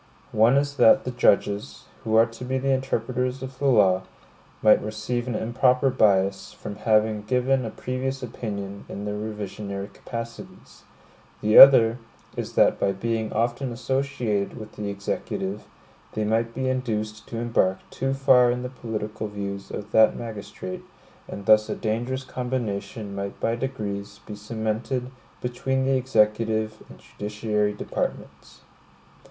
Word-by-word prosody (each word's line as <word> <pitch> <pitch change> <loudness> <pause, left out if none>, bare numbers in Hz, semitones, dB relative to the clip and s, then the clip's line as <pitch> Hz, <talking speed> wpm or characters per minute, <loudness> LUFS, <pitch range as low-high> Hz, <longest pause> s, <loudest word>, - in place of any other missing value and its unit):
One 115 +5 +4
is 140 0 0
that 110 - +6
the 125 - -3
judges, 100 -3 +1 0.2
who 110 0 0
are 115 +1 +7
to 115 +1 -10
be 130 +1 -1
the 135 +1 0
interpreters 130 0 -1
of 130 0 -8
the 140 - +1
law, 95 -7 +4 0.6
might 110 - +6
receive 110 +3 -3
an 120 - -2
improper 125 +4 +2
bias, 100 -5 +2
from 100 - -8
having 110 -1 +2
given 125 +3 +1
a - - -3
previous 130 +3 -4
opinion 100 -4 -6
in 100 - -6
their 105 - -2
revisionary 105 -1 -5
capacities; 115 -1 -9 0.5
the 110 +1 +6
other 120 -3 +9 0.4
is - - -5
that - - +4
by 100 - +1
being 110 +2 -2
often 120 +3 -1
associated 125 -5 -2
with 110 -2 -9
the 105 -1 -5
Executive, 100 0 -4 0.5
they 110 - -1
might 115 +2 0
be 130 0 -1
induced 110 -5 -2
to 115 - -6
embark 115 -5 +1
too 135 0 -1
far 130 -3 +5
in 125 +1 -1
the 125 - -4
political 110 -3 -5
views 100 -1 -6
of 105 +1 -7
that 110 0 +5
magistrate, 120 - -7 0.5
and 100 - -8
thus 110 0 +5
a - - -1
dangerous 120 +4 -2
combination 110 -5 -4
might 100 0 -5
by 115 - 0
degrees 105 -6 -5
be 105 - -7
cemented 110 +4 -3 0.3
between 130 +2 -1
the 135 0 +2
executive 110 -3 +1
and - - -12
judiciary 105 0 -2
departments. - - -5
110 Hz, 145 wpm, -25 LUFS, 105-125 Hz, 0.6 s, other